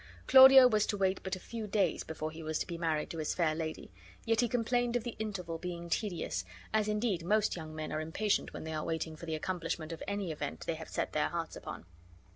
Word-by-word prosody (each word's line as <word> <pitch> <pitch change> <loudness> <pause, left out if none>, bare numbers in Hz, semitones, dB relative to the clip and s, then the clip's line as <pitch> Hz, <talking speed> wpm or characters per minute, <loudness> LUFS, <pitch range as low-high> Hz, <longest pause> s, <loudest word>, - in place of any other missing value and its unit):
Claudio 265 0 +10
was 215 -3 +2
to 205 - -1
wait 190 -1 +1
but 190 -1 -3
a - - -8
few 225 +2 -6
days 195 -4 +1
before 155 0 -5
he 160 +1 -9
was 155 0 -2
to - - -2
be 170 - -5
married 160 -3 -1
to 165 - -5
his 155 - -1
fair 165 -3 +2
lady; 155 - -5 0.3
yet 225 -1 +2
he 240 - +2
complained 245 +1 +1
of 240 - +1
the 240 - -5
interval 180 -6 -4
being 170 -1 -6
tedious, 175 - -1 0.3
as 215 -1 +2
indeed 210 -5 0
most 215 +4 +2
young 155 -2 -7
men 155 0 -4
are 155 - -1
impatient 195 +7 0
when - - -7
they 160 0 -5
are 155 -1 -2
waiting 160 -1 -3
for 170 +2 -10
the 160 - -1
accomplishment 165 -1 -3
of 165 - -7
any 200 -3 -2
event 80 - -5
they - - 0
have - - -8
set - - -2
their - - +1
hearts - - -4
upon. - - -8
175 Hz, 240 wpm, -32 LUFS, 160-215 Hz, 0.3 s, Claudio